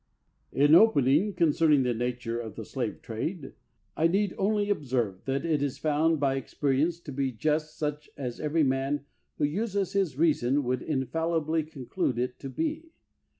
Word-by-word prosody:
In 145 Hz, +2 st, +4 dB
opening, 170 Hz, -, +5 dB
concerning 155 Hz, -4 st, +3 dB
the 125 Hz, -1 st, +1 dB
nature 120 Hz, 0 st, -3 dB
of 110 Hz, -3 st, -7 dB
the 110 Hz, -, -7 dB
slave 120 Hz, -4 st, -4 dB
trade, 135 Hz, -, -4 dB, 0.4 s
I 165 Hz, -, +3 dB
need 195 Hz, +3 st, +1 dB
only 205 Hz, +1 st, +1 dB
observe 125 Hz, -, -1 dB
that 135 Hz, +4 st, -1 dB
it 155 Hz, -4 st, +1 dB
is 140 Hz, -2 st, -2 dB
found 155 Hz, +1 st, +1 dB
by 135 Hz, -1 st, +1 dB
experience 145 Hz, +5 st, 0 dB
to 145 Hz, -, -8 dB
be 135 Hz, -1 st, -1 dB
just 155 Hz, +5 st, -1 dB
such 150 Hz, -1 st, -3 dB
as 125 Hz, -4 st, -5 dB
every 155 Hz, +1 st, +1 dB
man 135 Hz, +1 st, 0 dB, 0.3 s
who -, -, -2 dB
uses 200 Hz, +4 st, -1 dB
his 190 Hz, -9 st, 0 dB
reason 145 Hz, -3 st, +2 dB
would 125 Hz, 0 st, -1 dB
infallibly 160 Hz, +3 st, 0 dB
conclude 150 Hz, -2 st, -3 dB
it 125 Hz, +1 st, -2 dB
to 135 Hz, -, -6 dB
be. 320 Hz, -, -3 dB
145 Hz, 160 wpm, -28 LUFS, 130-165 Hz, 0.4 s, opening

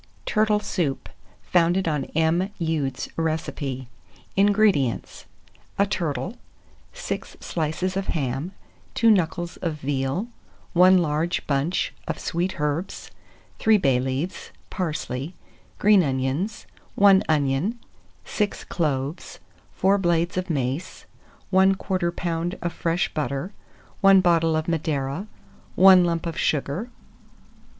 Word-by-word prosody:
TURTLE 215 Hz, -1 st, +2 dB
SOUP 160 Hz, -10 st, -2 dB, 0.3 s
(founded 175 Hz, +1 st, +2 dB
on 150 Hz, -4 st, 0 dB
M. 165 Hz, +4 st, +2 dB
Ude's 160 Hz, -5 st, -2 dB
Recipe). 150 Hz, -5 st, -3 dB, 0.5 s
189. 195 Hz, +1 st, +4 dB
INGREDIENTS. 200 Hz, -, +1 dB, 0.5 s
A 200 Hz, -, +4 dB
turtle, 185 Hz, -, -3 dB, 0.5 s
6 -, -, -6 dB
slices 170 Hz, +3 st, -2 dB
of 195 Hz, 0 st, -2 dB
ham, 140 Hz, +3 st, -2 dB, 0.4 s
2 230 Hz, -1 st, +5 dB
knuckles 175 Hz, -3 st, 0 dB
of 165 Hz, -3 st, -2 dB
veal, 140 Hz, -, -2 dB, 0.5 s
1 185 Hz, +1 st, +6 dB
large 165 Hz, 0 st, 0 dB
bunch 145 Hz, +5 st, 0 dB
of -, -, -2 dB
sweet 180 Hz, +1 st, -2 dB
herbs, 150 Hz, +5 st, -3 dB, 0.5 s
3 220 Hz, -1 st, +5 dB
bay 135 Hz, -9 st, +2 dB
leaves, 135 Hz, +7 st, -3 dB, 0.2 s
parsley, 155 Hz, -3 st, -3 dB, 0.4 s
green 205 Hz, -1 st, +5 dB
onions, 140 Hz, +8 st, -2 dB, 0.3 s
1 200 Hz, -1 st, +6 dB
onion, 150 Hz, -, +1 dB, 0.5 s
6 210 Hz, -2 st, -2 dB
cloves, 145 Hz, -2 st, -3 dB, 0.4 s
4 195 Hz, +1 st, +3 dB
blades 175 Hz, -1 st, +1 dB
of 185 Hz, 0 st, -2 dB
mace, 140 Hz, +3 st, -3 dB, 0.5 s
1/4 190 Hz, +1 st, +5 dB, 0.3 s
lb. 170 Hz, +1 st, -3 dB
of 175 Hz, -1 st, -2 dB
fresh 170 Hz, +2 st, -1 dB
butter, 150 Hz, +5 st, -3 dB, 0.5 s
1 195 Hz, -1 st, +7 dB
bottle 165 Hz, -3 st, +3 dB
of 155 Hz, 0 st, -1 dB
Madeira, 155 Hz, +1 st, -2 dB, 0.5 s
1 185 Hz, -1 st, +8 dB
lump 170 Hz, -1 st, -1 dB
of 165 Hz, -1 st, -4 dB
sugar. 155 Hz, -, -1 dB
170 Hz, 110 wpm, -24 LUFS, 145-190 Hz, 0.5 s, 1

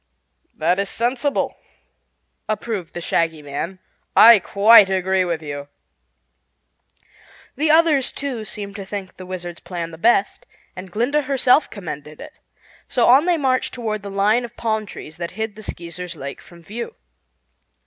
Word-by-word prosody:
"That 175 Hz, +4 st, +1 dB
is 200 Hz, 0 st, -1 dB
sensible," 255 Hz, +4 st, -1 dB, 0.9 s
approved 210 Hz, -4 st, -3 dB
the 175 Hz, -, -4 dB
Shaggy 165 Hz, -3 st, 0 dB
Man. 145 Hz, +6 st, -5 dB, 0.4 s
"I 230 Hz, -1 st, +9 dB
quite 200 Hz, +2 st, +6 dB
agree 190 Hz, 0 st, +1 dB
with 170 Hz, -3 st, -3 dB
you." 145 Hz, -1 st, -6 dB, 1.9 s
The 305 Hz, +3 st, 0 dB
others, 310 Hz, -4 st, +4 dB
too, 265 Hz, -5 st, -4 dB
seemed 200 Hz, -2 st, -7 dB
to 200 Hz, -, -6 dB
think 195 Hz, -1 st, -7 dB
the 185 Hz, -, -10 dB
Wizard's 175 Hz, -2 st, -6 dB
plan 170 Hz, -2 st, -6 dB
the 160 Hz, -, -11 dB
best, 215 Hz, -1 st, +2 dB, 0.3 s
and 185 Hz, +1 st, -8 dB
Glinda 250 Hz, +9 st, +1 dB
herself 270 Hz, +1 st, +3 dB
commended 150 Hz, -6 st, -8 dB
it, -, -, -10 dB, 0.5 s
so 245 Hz, -, +2 dB
on 265 Hz, +6 st, +6 dB
they 350 Hz, -2 st, +3 dB
marched 260 Hz, -4 st, 0 dB
toward 220 Hz, -4 st, -3 dB
the 200 Hz, -, -7 dB
line 205 Hz, +5 st, +2 dB
of 240 Hz, 0 st, -9 dB
palm 220 Hz, -2 st, -1 dB
trees 160 Hz, -3 st, -10 dB
that 170 Hz, +3 st, -6 dB
hid 220 Hz, -1 st, -3 dB
the 215 Hz, -, -10 dB
Skeezers' 175 Hz, -2 st, -7 dB
lake 140 Hz, -2 st, -7 dB
from 170 Hz, -1 st, -16 dB
view. 235 Hz, -, -6 dB
200 Hz, 150 wpm, -21 LUFS, 175-240 Hz, 1.9 s, I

